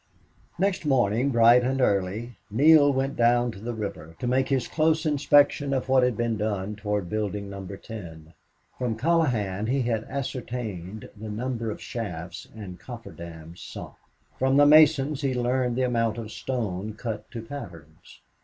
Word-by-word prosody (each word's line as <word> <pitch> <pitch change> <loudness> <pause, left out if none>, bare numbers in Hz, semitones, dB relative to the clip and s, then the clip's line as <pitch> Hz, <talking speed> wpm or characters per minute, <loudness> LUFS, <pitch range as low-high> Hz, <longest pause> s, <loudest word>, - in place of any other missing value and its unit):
Next 195 0 0
morning, 125 -3 +2
bright 120 0 +6
and 135 +2 0
early, 105 +1 0
Neale 145 +5 +6
went 135 +1 -1
down 120 0 +3
to 100 - -11
the 120 +3 -5
river 100 -7 -6
to - - -5
make 130 +2 +1
his 135 -3 +1
close 160 +1 +1
inspection 145 -1 +3
of 130 - -2
what 130 0 +5
had 125 -3 +1
been 115 -2 0
done 105 -1 -2
toward 105 -3 -2
building 105 0 -3
Number 100 0 -7
Ten. 85 -8 -10 0.5
From 120 -3 -1
Colohan 115 - +1
he 130 0 0
ascertained 115 -5 -4
the 110 +1 -8
number 115 +1 -3
of 105 - -5
shafts 90 -5 -6
and 95 -5 -8
coffer 120 +1 -9
dams 85 0 -10
sunk; - - -8 0.5
from 135 +1 +3
the 145 - +7
masons 150 -1 +5
he 135 -3 0
learned 125 0 0
the 130 - +1
amount 115 -3 0
of 110 -2 -6
stone 110 -5 -3
cut 105 0 -5
to 115 -3 -7
patterns. 85 - -10
115 Hz, 160 wpm, -26 LUFS, 100-130 Hz, 0.5 s, the